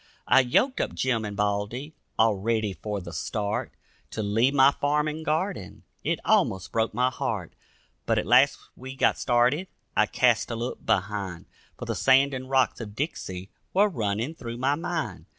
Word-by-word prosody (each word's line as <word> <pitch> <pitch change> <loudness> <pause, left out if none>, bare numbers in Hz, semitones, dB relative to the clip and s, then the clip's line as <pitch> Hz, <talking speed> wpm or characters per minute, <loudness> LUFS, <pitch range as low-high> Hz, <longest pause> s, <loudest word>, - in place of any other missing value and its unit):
I - - +6
yoked 135 - +2
up - - -3
Jim 125 -4 0
and 105 -1 -5
Baldy, 105 +8 -2 0.2
all 110 -1 +4
ready 110 0 -1
for 105 +3 -4
the 85 -1 -9
start; 105 -1 -2 0.4
To 110 - -4
leave 115 +7 +2
my 135 0 +7
farm 150 +2 0
and 155 +1 -4
garden, 160 - -2 0.2
it - - 0
almost 95 -1 +2
broke 110 -1 0
my 125 +2 +2
heart; 105 -8 -3 0.5
But - - +2
at - - 0
last - - +5 0.2
we 130 +1 -9
got - - +2
started, 125 +8 +2 0.3
I 105 - +4
cast 120 0 +2
a 115 - -3
look 120 +2 -5
behind, 95 -2 -1 0.3
For - - -6
the - - -2
sand 135 +1 +4
and 130 0 -5
rocks 130 -2 +2
of 105 -2 -8
Dixie 95 - -4 0.2
were 205 +2 +5
running 115 - -2
through 120 -6 -7
my 135 +3 +1
mind. 150 - -4
120 Hz, 175 wpm, -26 LUFS, 105-135 Hz, 0.5 s, my